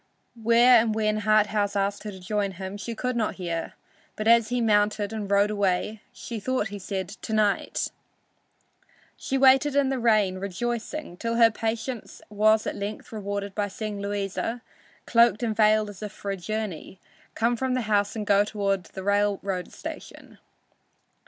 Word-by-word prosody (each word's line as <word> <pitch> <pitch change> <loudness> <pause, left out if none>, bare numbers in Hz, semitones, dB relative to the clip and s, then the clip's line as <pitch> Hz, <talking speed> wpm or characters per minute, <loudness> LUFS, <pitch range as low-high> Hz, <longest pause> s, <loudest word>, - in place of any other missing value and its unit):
Where 235 +2 +6
and 220 -1 -1
when 215 -1 +1
Harthouse 210 -1 +2
asked 200 0 0
her 210 - -4
to 190 - -10
join 200 +1 -2
him, 190 +2 -6
she 225 +3 -5
could 250 +2 -2
not 225 -3 -1
hear, 170 -3 -4 0.4
but 215 - -3
as 230 -1 +5
he 245 0 0
mounted 210 -1 +2
and 210 -3 -4
rode 200 +1 +3
away 205 +1 0
she 230 -2 -7
thought 255 0 -1
he 205 0 -7
said 190 -1 -4
"To 220 +1 -7
night." 210 -2 +1 1.3
She 270 - -2
waited 270 +2 +5
in 280 -2 +3
the 265 -1 -1
rain, 210 -5 +2
rejoicing, 235 +4 -4
till 230 +3 -2
her 230 -1 +6
patience 225 +2 -4
was 215 +1 +3
at - - -3
length 205 +1 -6
rewarded 200 -2 -4
by 205 0 -1
seeing 205 0 -5
Louisa, 205 +4 -3 0.4
cloaked 235 -1 +4
and 220 -2 0
veiled 215 0 +4
as 195 - -14
if 210 -1 -5
for 200 -1 -5
a - - -1
journey, 195 -1 -5 0.4
come 235 +2 +1
from 255 +1 -1
the 255 - 0
house 205 -2 +1
and 215 -2 -3
go 200 0 +4
toward 200 -3 -1
the 190 - -9
railroad 200 -2 0
station. - - -9
210 Hz, 170 wpm, -26 LUFS, 200-230 Hz, 1.3 s, Where